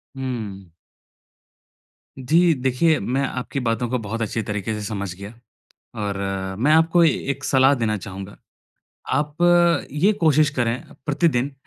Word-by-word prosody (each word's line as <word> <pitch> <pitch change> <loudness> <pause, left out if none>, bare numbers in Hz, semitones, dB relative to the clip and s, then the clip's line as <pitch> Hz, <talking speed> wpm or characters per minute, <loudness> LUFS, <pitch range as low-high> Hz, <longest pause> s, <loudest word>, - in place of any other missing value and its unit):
हम्म। 110 -8 -5 1.5
जी, 165 +6 +3
देखिए, 135 +4 +1
मैं 130 +3 -1
आपकी 130 +2 -4
बातों 120 0 -1
को 125 - 0
बहुत 115 +2 -5
अच्छी 115 +1 -2
तरीक़े 105 +1 -3
से 105 - -4
समझ 100 -3 -4
गया 100 +3 -9 0.7
और 100 -1 -2 0.4
मैं 145 +6 +3
आपको 165 +2 +4
ए 165 - +6 0.2
एक 140 +1 -8
सलाह 135 +1 +4
देना 110 -4 -1
चाहूँगा। 95 0 -8 0.8
आप 150 +2 -1 0.6
ये 180 +9 +3
कोशिश 155 -2 +4
करें 120 0 0 0.2
प्रतिदिन, 145 -3 +1
125 Hz, 135 wpm, -22 LUFS, 110-150 Hz, 1.5 s, ए